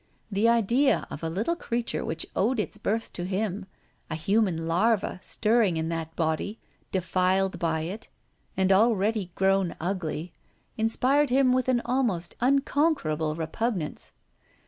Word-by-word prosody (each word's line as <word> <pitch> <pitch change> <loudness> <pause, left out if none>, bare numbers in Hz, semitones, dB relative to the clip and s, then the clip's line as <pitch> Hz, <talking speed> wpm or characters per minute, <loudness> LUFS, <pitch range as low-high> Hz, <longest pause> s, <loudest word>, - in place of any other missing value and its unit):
The 205 +4 +3
idea 235 +3 +3
of - - -6
a 165 - -2
little 215 - -1
creature 235 -8 -2
which 160 0 -3
owed 235 +4 +1
its 210 0 -3
birth 220 +2 -2
to 175 - -5
him, 195 +1 -2 0.4
a 160 - -2
human 180 -1 +1
larva 190 +2 +1
stirring 215 -6 +2
in 160 0 -1
that 165 -1 -4
body 160 +6 -1 0.3
defiled 185 +1 +1
by 160 -2 0
it 185 +8 -5 0.5
and 190 0 +3
already 210 -1 +2
grown 195 -2 +2
ugly, 170 -2 -3 0.4
inspired 255 +5 +2
him 255 0 +4
with 255 0 +1
an 240 -2 +2
almost 235 -9 0
unconquerable 265 - +1
repugnance. 165 +1 -3
195 Hz, 135 wpm, -27 LUFS, 170-235 Hz, 0.5 s, him